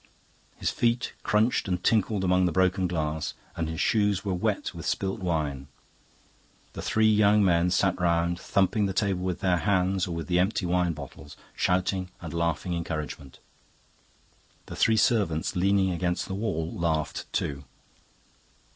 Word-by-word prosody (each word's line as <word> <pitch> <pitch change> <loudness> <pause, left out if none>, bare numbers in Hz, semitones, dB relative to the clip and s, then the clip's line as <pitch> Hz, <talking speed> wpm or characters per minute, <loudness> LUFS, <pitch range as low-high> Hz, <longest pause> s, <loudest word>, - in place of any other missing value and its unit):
His - - -1
feet 120 +1 0
crunched 110 +1 +1
and 90 -1 -2
tinkled 105 -3 +2
among 90 0 +3
the - - 0
broken 95 +1 +2
glass, 80 -3 -2 0.2
and 80 -1 -2
his 80 0 -5
shoes 105 -2 +1
were 95 - 0
wet 90 - -1
with - - -7
spilt 95 +2 -1
wine. 75 -7 -2 1.1
The - - -6
three 110 0 +2
young 105 -1 +4
men 85 -1 +3
sat 90 0 +1
round, 85 0 +1
thumping 100 +2 +1
the 95 - -3
table 100 -3 0
with 90 -1 -3
their 90 -2 +2
hands 95 -1 +1
or 85 - -4
with 85 - -4
the 90 0 +1
empty 95 +1 +1
wine 90 -1 +1
bottles, 75 -3 -10 0.2
shouting 95 0 0
and 85 -2 -7
laughing 85 +1 -1
encouragement. 75 -5 -5 1.3
The - - -8
three 110 0 +3
servants 100 -8 +1
leaning 95 +1 +2
against 90 +1 -1
the 95 - -5
wall 95 -6 -2
laughed 80 -3 -2
too. 70 -1 -2
90 Hz, 155 wpm, -27 LUFS, 85-100 Hz, 1.3 s, young